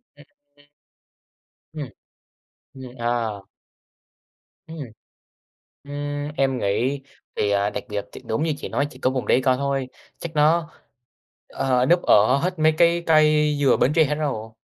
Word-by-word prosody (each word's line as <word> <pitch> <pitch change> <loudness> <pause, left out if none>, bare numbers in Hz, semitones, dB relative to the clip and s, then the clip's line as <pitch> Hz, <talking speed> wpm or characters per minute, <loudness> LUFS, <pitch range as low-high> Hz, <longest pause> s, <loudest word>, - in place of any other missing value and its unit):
Ừm. 145 0 -24 1.1
Ừm. 150 -4 -6 0.9
Ừm, 130 - -11 0.2
à! 120 -1 -1 1.4
Ừm. 160 0 -9 1.1
Ưm, 145 0 -4
em 135 -1 +1
nghĩ, 125 +7 0 0.4
thì, 105 - +1
à, 100 0 +1
đặc - - -5
biệt, 105 -1 -3
thì - - -10
đúng 110 +7 -2
như 160 -1 +1
chị - - -7
nói 140 - 0
chỉ 130 - -14
có 130 - +1
vùng 130 -1 -3
đấy - - +3
có 130 -1 +3
thôi. 135 -1 -2 0.3
Chắc 170 - -7
nó, 160 +2 +2 0.8
ờ, 125 -1 0
núp 175 +5 +3
ở 110 +6 +4
hết 180 +3 -2
mấy 155 0 +5
cái 170 +1 +3
cây 150 -1 +4
dừa 140 - +4
Bến 140 - +2
Tre 165 - +6
hết 150 0 -1
rồi. 135 -8 -3
145 Hz, 150 wpm, -23 LUFS, 125-155 Hz, 1.4 s, Tre